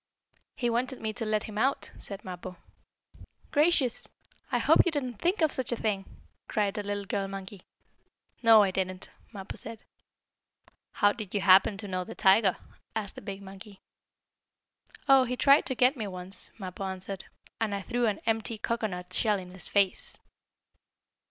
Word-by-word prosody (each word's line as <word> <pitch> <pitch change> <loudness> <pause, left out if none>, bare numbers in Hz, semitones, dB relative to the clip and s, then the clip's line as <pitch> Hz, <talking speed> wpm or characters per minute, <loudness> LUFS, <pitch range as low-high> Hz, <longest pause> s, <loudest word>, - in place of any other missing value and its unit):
"He 240 - -1
wanted 245 +2 -1
me 220 -1 -3
to 225 +1 -4
let 215 -1 +1
him 210 -1 -5
out," 270 +4 0
said 200 0 -7
Mappo. 180 0 -7 0.9
"Gracious! 295 -5 +3 0.4
I - - +2
hope - - +5
you 350 - 0
didn't 255 -7 -3
think 350 0 +1
of 310 - +3
such 255 -2 +1
a - - +1
thing!" 205 -4 -1 0.4
cried 205 -1 0
a - - 0
little 205 0 -3
girl 195 0 -2
monkey. 195 0 -8 0.8
"No, 225 -3 +8
I 195 - +1
didn't," 185 0 -3 0.2
Mappo 195 -3 -7
said. 225 -1 -4 1.1
"How 205 -1 +4
did 215 -4 -7
you 200 - +1
happen 190 +1 +6
to 205 0 -6
know 185 -1 -2
the - - -9
tiger?" 195 0 +4 0.4
asked 210 -3 -3
the - - -10
big 200 -1 -7
monkey. 195 +1 -12 1.3
"Oh, 270 -1 +7
he 250 +1 -3
tried 280 +3 +5
to 260 - -1
get 250 +3 +4
me 220 -5 -4
once," 185 0 -7
Mappo 190 -2 -6
answered, 190 0 -6 0.3
"and 215 -3 0
I 200 - -4
threw 245 +1 0
an 205 -2 -1
empty 225 0 0
cocoanut 210 -5 -3
shell 210 -3 +2
in 180 -1 -10
his 185 0 -6
face!" 200 -2 +1
205 Hz, 170 wpm, -29 LUFS, 195-235 Hz, 1.3 s, No